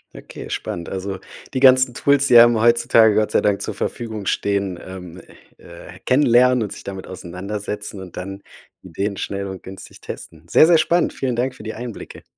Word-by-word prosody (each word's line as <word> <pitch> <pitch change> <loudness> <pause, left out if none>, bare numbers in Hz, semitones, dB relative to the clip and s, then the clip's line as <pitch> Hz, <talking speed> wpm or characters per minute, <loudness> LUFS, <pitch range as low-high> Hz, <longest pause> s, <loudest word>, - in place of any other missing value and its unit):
Okay, - - -10
spannend. 85 -1 -5
Also 95 0 -5 0.4
die - - +1
ganzen 130 -1 +5
Tools, 140 -1 +2
die 120 -2 +7
einem 120 -1 +7
heutzutage 115 -2 +4
Gott 110 0 +1
sei - - +2
Dank 100 -1 0
zur - - -4
Verfügung 110 -4 -5
stehen, 100 -3 -1
ähm, 90 -2 -10 0.4
äh, - - -13
kennenlernen 125 -2 +4
und 105 - -3
sich - - -10
damit 95 -1 -7
auseinandersetzen 100 +3 -6
und 90 -2 -11
dann 95 +2 -7 0.4
Ideen 95 +3 -4
schnell 100 0 -4
und 95 -1 -8
günstig 95 0 -12
testen. 80 0 -10
Sehr, 155 - +6
sehr 170 - +6
spannend. 175 +2 +1
Vielen 125 -3 -2
Dank 125 +2 -2
für - - -12
die 110 - -5
Einblicke. 120 -1 -9
105 Hz, 180 wpm, -20 LUFS, 95-120 Hz, 0.4 s, die